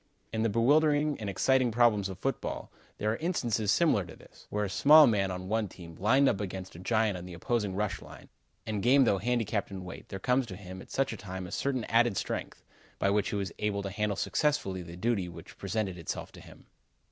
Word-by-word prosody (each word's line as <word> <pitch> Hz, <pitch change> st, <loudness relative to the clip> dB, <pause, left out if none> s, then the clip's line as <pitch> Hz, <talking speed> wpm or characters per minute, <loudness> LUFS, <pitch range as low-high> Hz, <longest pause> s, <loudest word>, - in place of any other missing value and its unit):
In 110 Hz, -, 0 dB
the 115 Hz, -, +2 dB
bewildering 145 Hz, +6 st, +3 dB
and 105 Hz, -2 st, -4 dB
exciting 130 Hz, +6 st, +2 dB
problems 110 Hz, -4 st, +3 dB
of 95 Hz, -, -7 dB
football, -, -, -3 dB, 0.3 s
there 105 Hz, +1 st, 0 dB
are 115 Hz, -, -2 dB
instances 120 Hz, -, 0 dB
similar 155 Hz, -, +3 dB
to 85 Hz, -, -11 dB
this, -, -, -18 dB
where 105 Hz, 0 st, -1 dB
a -, -, -4 dB
small 150 Hz, +6 st, +8 dB
man 100 Hz, -5 st, +2 dB
on 90 Hz, 0 st, -5 dB
one 110 Hz, +1 st, 0 dB
team, 85 Hz, -2 st, -12 dB
lined 130 Hz, +8 st, +4 dB
up 100 Hz, -, +1 dB
against 95 Hz, -2 st, -6 dB
a -, -, -9 dB
giant 110 Hz, -1 st, +1 dB
in 90 Hz, -, -9 dB
the 90 Hz, -1 st, -8 dB
opposing 105 Hz, +2 st, -1 dB
rush 100 Hz, -3 st, -2 dB
line, -, -, -13 dB, 0.4 s
and 105 Hz, -2 st, -2 dB
game 135 Hz, +5 st, +5 dB
though 100 Hz, -5 st, +2 dB
handicapped 115 Hz, -1 st, -1 dB
in 95 Hz, -2 st, -7 dB
weight 90 Hz, -, -9 dB
there 95 Hz, -, -5 dB
comes 125 Hz, +5 st, +1 dB
to 95 Hz, -, -7 dB
him 95 Hz, -1 st, -9 dB
at -, -, -14 dB
such 135 Hz, -3 st, 0 dB
a -, -, -7 dB
time 95 Hz, -1 st, -6 dB
a 90 Hz, -, -9 dB
certain 130 Hz, -4 st, -1 dB
added 115 Hz, -2 st, +2 dB
strength, -, -, -4 dB, 0.3 s
by 100 Hz, -, +1 dB
which 105 Hz, -1 st, +1 dB
he -, -, -3 dB
was 100 Hz, -3 st, -2 dB
able 100 Hz, -1 st, -1 dB
to 100 Hz, -, -4 dB
handle 105 Hz, +1 st, -1 dB
successfully 120 Hz, -13 st, 0 dB
the 85 Hz, 0 st, -9 dB
duty 100 Hz, -3 st, 0 dB
which 85 Hz, -1 st, -12 dB
presented 100 Hz, -2 st, -2 dB
itself 85 Hz, -, -5 dB
to -, -, -13 dB
him. -, -, -15 dB
105 Hz, 225 wpm, -30 LUFS, 95-120 Hz, 0.4 s, small